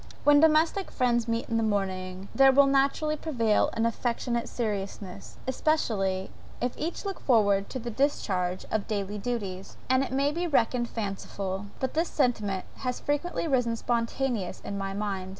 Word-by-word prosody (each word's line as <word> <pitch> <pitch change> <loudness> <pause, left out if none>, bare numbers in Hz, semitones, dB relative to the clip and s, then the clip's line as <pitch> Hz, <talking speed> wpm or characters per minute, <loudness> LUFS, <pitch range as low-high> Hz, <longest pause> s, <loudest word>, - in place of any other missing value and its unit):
When 290 0 +7
domestic 320 +5 +3
friends 240 -2 +1
meet 230 0 -1
in 230 -1 0
a - - +1
morning, 190 -3 -2
there 270 0 +7
will 280 +1 +6
naturally 275 +3 +2
prevail 235 -9 +1
an 225 0 0
affectionate 235 0 -1
seriousness, 200 -3 -4
especially, 215 -9 0 0.3
if 245 0 -1
each 335 +6 -4
look 390 -1 -3
forward 205 -5 +3
to - - -4
the 240 -1 -5
discharge 190 -9 0
of 220 -2 -1
daily 205 -1 -2
duties; 200 -5 -4
and 260 +1 +4
it 275 - -5
may 275 +2 +2
be 345 +3 -1
reckoned 240 -4 +2
fanciful, 195 -2 -4
but 260 - -2
this 330 +2 +1
sentiment 215 -9 0
has 250 -2 -3
frequently 290 +4 -1
risen 245 -5 +2
spontaneously 235 -3 -2
in 200 - -3
my 195 0 -3
mind. 195 -2 -3
230 Hz, 160 wpm, -28 LUFS, 200-270 Hz, 0.3 s, When